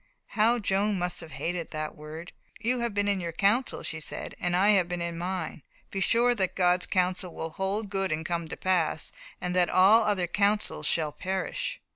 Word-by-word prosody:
how 225 +3 +3
Joan 205 -1 +1
must 175 0 -2
have 165 -1 -10
hated 175 -1 -3
that 155 -1 -4
word! 155 +3 -9 0.3
"You 245 +2 0
have 235 -1 -1
been 205 0 0
in 200 -2 +1
your 170 -1 -3
council," 210 +9 +1
she 160 - -4
said, 155 - -6
"and 175 0 0
I 195 +3 +4
have 190 -4 +4
been 175 0 -2
in 170 0 -2
mine. 175 -2 -4 0.3
Be 195 - -3
sure 240 +5 +3
that 190 -5 -1
God's 180 -1 +2
counsel 180 -1 0
will 160 - -4
hold 195 +4 -2
good 195 -2 0
and 155 +1 -2
come 170 -1 -2
to - - -7
pass, 180 -4 0 0.3
and 180 0 -3
that 180 -1 +3
all 195 +5 +6
other 205 -4 +1
counsel 200 +1 +1
shall 155 0 +1
perish." 190 - -3
185 Hz, 200 wpm, -28 LUFS, 170-205 Hz, 0.3 s, all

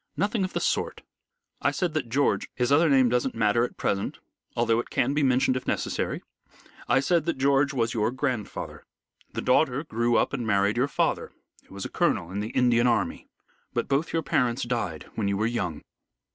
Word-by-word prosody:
"Nothing 205 0 0
of 185 - -3
the - - 0
sort. - - -1 0.6
I - - +3
said 175 -4 -1
that 145 -7 -2
George 140 +4 +1
his 125 +1 0
other 160 +3 +5
name 135 -2 +5
doesn't 125 +2 0
matter 115 +1 +2
at 125 - -4
present, 100 0 -1 0.4
although 115 -1 +2
it - - -4
can 130 +3 +1
be 150 - +1
mentioned 130 -1 +3
if 130 - -4
necessary - - -2 0.7
I - - +5
said 160 +3 +1
that 170 - -1
George 140 +1 +3
was 115 -4 0
your 110 -1 +1
grandfather. 125 -4 -4 0.5
The - - -3
daughter 130 +1 +2
grew 120 -4 0
up - - +1
and 120 -4 -2
married 100 0 +2
your 125 +3 +2
father, 140 - -1 0.3
who - - -14
was 100 - -5
a - - -4
colonel 85 - 0
in 100 - -3
the 105 +2 -3
Indian 120 -1 +3
army. 120 - 0 0.5
But - - 0
both 140 +4 0
your 165 -1 0
parents 125 -2 +1
died 115 -10 -3
when 105 -3 -1
you 100 0 0
were 110 - +1
young. 95 -10 -2
125 Hz, 200 wpm, -26 LUFS, 115-140 Hz, 0.7 s, other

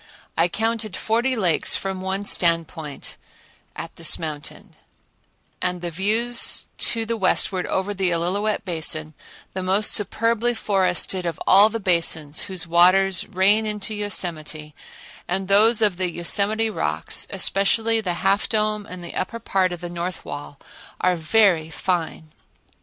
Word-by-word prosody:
I 165 +1 +3
counted 220 +1 -3
forty 235 +4 0
lakes 180 -8 +2
from 190 -1 -4
one 190 +2 -3
standpoint 165 -5 +1 0.6
an - - -6
this - - +3
mountain, 150 -2 -7 0.9
and 180 -1 -2
the 175 - -3
views 220 +7 +1
to 225 -1 +3
the 230 +1 -2
westward 190 -2 0
over 190 +2 -2
the 190 -2 -1
Illilouette 190 +6 -1
Basin, 155 -3 -1 0.4
the 190 - -4
most 190 +3 +2
superbly 230 +3 +1
forested 185 -3 +1
of 165 - -5
all 200 +3 +6
the 230 +1 -4
basins 165 -5 +1
whose 185 -3 -1
waters 185 +2 +3
rain 205 +3 +2
into 210 +1 -3
Yosemite, 165 -7 -3 0.5
and 190 +1 -2
those 215 +3 +4
of 200 -4 +2
the 185 -1 -1
Yosemite 205 +6 0
rocks, - - 0
especially 225 +3 +2
the 180 -4 -2
Half 200 +2 +2
Dome 215 -2 -1
and 180 -1 -9
the 170 - -7
upper 230 +5 -3
part 190 -5 -1
of 175 -1 -7
the 175 - -5
north 175 +1 -6
wall, 145 0 -8 0.4
are 185 0 +1
very 170 -1 +2
fine. 160 -2 -3
190 Hz, 140 wpm, -22 LUFS, 170-215 Hz, 0.9 s, all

